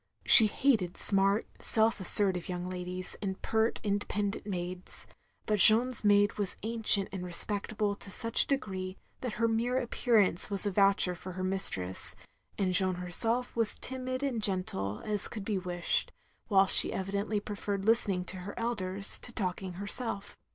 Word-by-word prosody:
She 220 - +11
hated 210 -7 -1
smart, 195 +1 +4
self 220 0 +2
assertive 190 -1 +3
yotmg 180 0 -6
ladies, 180 0 -6
and 190 -2 -5
pert 220 +1 -2
independent 205 0 -4
maids; 180 -1 -8 0.4
but 210 -1 -2
Jeanne's 235 +4 +5
maid 205 0 +1
was 200 -3 0
ancient 220 -3 +2
and 190 -2 -7
respectable 205 +3 -5
to 200 - -7
such 230 +3 +2
a - - -1
degree 190 -8 -5 0.2
that 245 -4 -6
her 230 +1 -1
mere 235 +3 -2
appearance 230 -7 -1
was 200 0 0
a 205 - -2
voucher 195 -1 +1
for 185 +1 -11
her 185 +1 -7
nMstress, 185 - -3 0.4
and 185 -2 -2
Jeanne 185 -1 +3
herself 225 +8 -3
was 230 -2 +3
timid 255 +1 -5
and 255 -5 -3
gentle 180 - -1
as 210 -2 -1
could 210 -4 -9
be 205 -3 -3
wished, 175 -1 -2 0.4
whilst 195 -2 +4
she - - +9
evidently 200 +2 -4
preferred 205 -1 -6
listening 205 -5 +1
to 185 - -6
her 185 +3 -10
elders, 200 -4 -2
to 245 - -9
talking 185 -3 -5
herself. 205 +2 -6
200 Hz, 160 wpm, -28 LUFS, 185-220 Hz, 0.4 s, She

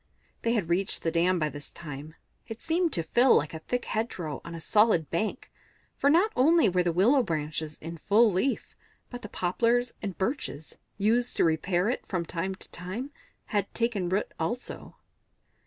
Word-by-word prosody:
They 230 - +1
had 210 -8 0
reached 180 +3 0
the 165 - +1
dam 180 +3 +2
by 155 -2 0
this 145 0 -8
time; 150 -1 -8 0.3
it 225 0 -7
seemed 335 +1 +1
to 165 - 0
Phil 245 +9 +5
like 150 +2 +1
a 160 - -5
thick 245 +9 -3
hedgerow 180 - -3
on 170 0 -7
a - - -6
solid 190 -3 +3
bank, 190 +6 -2 0.4
for 280 - +2
not 355 +9 +4
only 310 +1 +5
were 180 -1 +2
the 175 -1 +1
willow 225 - +4
branches 155 - -3
in 165 +1 -8
full 215 +6 +4
leaf, 195 +9 -1 0.4
but 245 -1 -7
the 210 - -8
poplars 235 +8 +1
and 195 -4 -4
birches, 190 - -3 0.2
used 230 +4 +1
to - - +4
repair 175 +3 +1
it 245 - -1
from 175 -3 -2
time 185 +3 -3
to - - -11
time, 200 +11 -5 0.3
had 205 -2 -1
taken 225 -6 0
root 190 +3 0
also. 230 +10 -4
190 Hz, 180 wpm, -28 LUFS, 165-235 Hz, 0.4 s, Phil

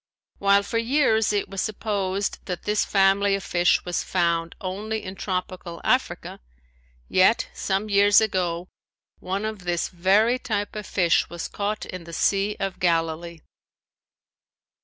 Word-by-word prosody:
While 200 0 +4
for 230 +3 -1
years 230 -3 +2
it 205 -1 0
was 195 -1 -4
supposed 200 -2 -2
that 180 -2 -5
this 210 0 +1
family 195 0 +3
of 195 - -5
fish 175 0 +2
was 175 -1 -1
found 170 -2 0
only 215 +3 -4
in 185 - -6
tropical 180 -3 -4
Africa, - - 0 0.7
yet - - +3
some 195 +2 -1
years 205 0 +5
ago 180 -5 -1 0.5
one 195 +3 -3
of 220 -1 -4
this 175 -2 -2
very 200 +7 +3
type 210 -5 -3
of 210 -2 -6
fish 175 -3 +2
was 170 -1 -5
caught 210 +1 -3
in 180 -2 -8
the 170 - -10
sea 200 +4 +1
of 195 -1 -3
Galilee. 165 -1 -1
195 Hz, 140 wpm, -24 LUFS, 175-210 Hz, 0.7 s, years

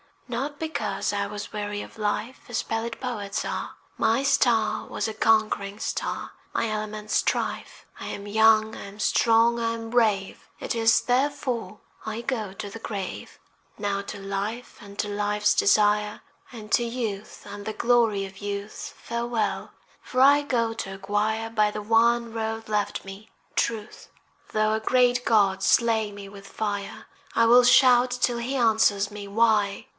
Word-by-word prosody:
Not 270 +4 -4
because 220 -11 -2
I 200 -1 -1
was 210 0 -7
weary 205 -1 -4
of - - -11
life 215 +4 -2
As 240 - -1
pallid 225 +1 -3
poets 210 -6 -3
are: - - -4 0.2
My 230 +5 +2
star 225 -6 +2
was - - -2
a - - -5
conquering 215 -2 +1
star, - - -3 0.2
My 230 - 0
element 215 0 -4
strife. - - -1
I - - -6
am 200 - -6
young, 220 +1 +4
I - - -8
am 200 +1 -12
strong, 230 +2 +3
I 230 0 0
am 225 0 -6
brave, 215 -5 +1
It - - -2
is 225 -1 +4
therefore 255 -4 -1 0.2
I 220 +1 -4
go 225 -6 -3
to 205 +1 -6
the 225 +3 -9
grave. 200 -4 -6 0.4
Now 200 -1 -1
to 205 - -7
life 200 +5 -4
and 200 -2 -12
to - - 0
life's 210 0 +1
desire, 210 +1 +3 0.3
And 220 -3 -10
to 240 - +4
youth 230 -4 -5
and 205 0 -8
the 220 - -3
glory 225 -3 +2
of 190 0 -11
youth, 205 0 -6
Farewell, 235 -1 -3 0.3
for 255 - -1
I 285 +2 +7
go 230 -5 0
to 195 -3 -5
acquire, 210 +3 -1
By 215 -2 +3
the 210 - -5
one 230 +2 +2
road 225 0 -4
left 210 -1 -1
me, 195 +3 -10 0.3
Truth. 225 -2 -2 0.5
Though 215 0 +2
a 220 - 0
great 245 +2 +2
God 195 -4 +3
slay 220 +2 +3
me 200 -1 -9
with 200 0 -12
fire 205 -1 -4 0.3
I 230 - +5
will 245 +2 +7
shout 250 0 +6
till 245 -1 0
he 250 +4 -3
answer 220 -4 +3 0.2
me. 205 -1 -7
Why? 210 -1 +2
220 Hz, 160 wpm, -25 LUFS, 205-235 Hz, 0.5 s, I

